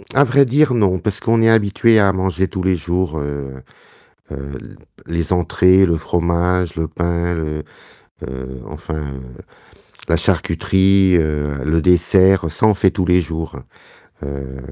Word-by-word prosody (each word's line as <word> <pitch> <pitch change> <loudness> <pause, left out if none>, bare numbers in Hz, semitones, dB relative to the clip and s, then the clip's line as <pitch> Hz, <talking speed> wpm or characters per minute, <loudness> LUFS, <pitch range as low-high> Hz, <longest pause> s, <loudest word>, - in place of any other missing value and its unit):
à 140 - +6
vrai 140 +1 +3
dire, 135 +2 +2
non, 100 -6 +2
parce 105 +2 -3
qu'on 115 0 +1
est 115 - +4
habitué 110 +1 +3
à 100 -2 +4
manger 95 0 -1
tous 95 - -5
les 95 0 +2
jours, 85 -1 -2
heu 70 -2 -6 0.7
heu, 70 -1 -7 0.5
les 85 +1 -2
entrées, 90 +2 +3
le 85 - +1
fromage, 85 +2 -1
le 80 0 -2
pain, 85 +2 -2
le, 75 -2 -4 0.7
heu, 65 0 -8
enfin, - - -7
heu, 70 -3 -7 0.9
la - - +2
charcuterie, 95 -1 +2
heu, 75 -3 -2
le 80 +2 +1
dessert, 90 +1 +3
ça, 110 - +1
on 105 - +3
fait 95 -1 +2
tous 95 -2 -2
les 90 0 +3
jours, 80 0 -6 0.7
hem 70 -1 -7
85 Hz, 150 wpm, -18 LUFS, 75-95 Hz, 0.9 s, à